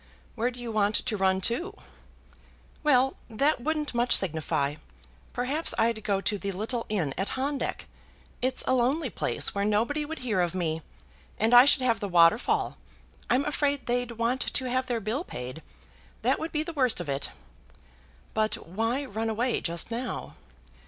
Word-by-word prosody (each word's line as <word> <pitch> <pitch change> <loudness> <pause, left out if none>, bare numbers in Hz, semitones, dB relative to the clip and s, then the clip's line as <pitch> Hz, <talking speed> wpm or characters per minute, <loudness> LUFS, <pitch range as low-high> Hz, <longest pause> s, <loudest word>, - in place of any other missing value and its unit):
"Where 240 +1 0
do 245 0 -10
you 240 -1 -5
want 210 -1 +2
to 215 - 0
run 190 -1 +2
to?" 345 - 0 1.1
"Well; 265 -3 +3
that 275 +5 +1
wouldn't 300 +1 -1
much 240 +1 +4
signify. 155 -4 0 0.5
Perhaps 275 +6 +1
I'd 225 -1 +1
go 200 -2 0
to 205 0 -1
the 200 0 -2
little 225 +5 -3
inn 170 -10 0
at 195 - -1
Handek. 275 +1 -2 0.6
It's 255 0 +1
a - - +2
lonely 260 +2 +1
place, 120 - -1
where 200 - 0
nobody 230 +9 +1
would 320 +2 -5
hear 210 -6 +1
of 175 0 -1
me, 160 -3 -1 0.6
and 225 +3 +2
I 245 +1 +10
should 280 -2 +4
have 230 -4 +2
the 205 -2 -3
waterfall. 175 +5 +3 0.5
I'm 255 +4 +3
afraid 285 -2 0
they'd 245 0 -1
want 235 +3 0
to 260 - 0
have 255 +1 0
their 235 -2 -1
bill 225 - -2
paid. 130 - -7 0.6
That - - +2
would 320 - -4
be 305 0 0
the 340 - -6
worst 255 -8 +2
of 175 - -5
it." 140 0 -2 1.0
"But 215 -4 -1
why 225 +10 -1
run 225 -1 -3
away 235 +3 0
just 170 +5 -2
now?" 245 +2 -4
235 Hz, 170 wpm, -28 LUFS, 200-260 Hz, 1.1 s, I